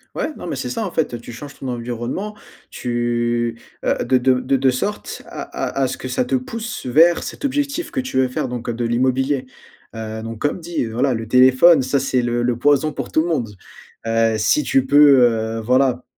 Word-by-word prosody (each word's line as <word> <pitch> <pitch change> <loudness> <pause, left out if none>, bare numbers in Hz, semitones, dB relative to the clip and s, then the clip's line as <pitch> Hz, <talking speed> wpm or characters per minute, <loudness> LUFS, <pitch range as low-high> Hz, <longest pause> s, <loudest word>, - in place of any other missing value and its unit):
Ouais, - - -1
non - - -9
mais, 165 - -4
c'est 130 -1 -4
ça, 220 - -2
en 180 - -5
fait, 155 - -1
heu: 120 - -4
tu 120 - -10
changes 140 +4 -10
ton 135 - -6
environnement, 120 - -4 0.3
tu, 120 -1 -1 0.3
heu, - - +2
de 130 - +3
de 125 0 +2
de 135 +1 +1
de 135 0 +3
sorte 130 +11 -3
à - - -7
à 345 - -3
à 130 - +2
ce - - -5
que 130 - -6
ça 125 - 0
te 130 +1 0
pousse 225 - -5
vers 165 +7 +4
cet - - -6
objectif 285 +4 -2
que 265 - -1
tu 255 - -4
veux 130 - +3
faire 125 0 -3
donc, 125 -1 -6
heu, 120 - -1
de 120 - -3
l'immobilier. 130 +3 0 0.5
Heu, 110 0 -5
donc 115 0 -7
comme 145 +7 -1
dit: 170 -3 -3
voilà 125 +4 0
le 115 -1 -5
téléphone 130 +5 +6
ça, 130 +2 0
c'est 130 -1 +1
le 120 0 0
le 120 -1 0
poison 145 +3 +3
pour - - -5
tout 155 - +2
le 165 - -2
monde. 115 -10 -2 0.5
Heu, 115 0 +2
si 110 +8 +2
tu 135 -1 +2
peux, 140 -1 +6
heu, 115 -1 +1
voilà, 125 +1 +2
130 Hz, 225 wpm, -20 LUFS, 120-145 Hz, 0.5 s, téléphone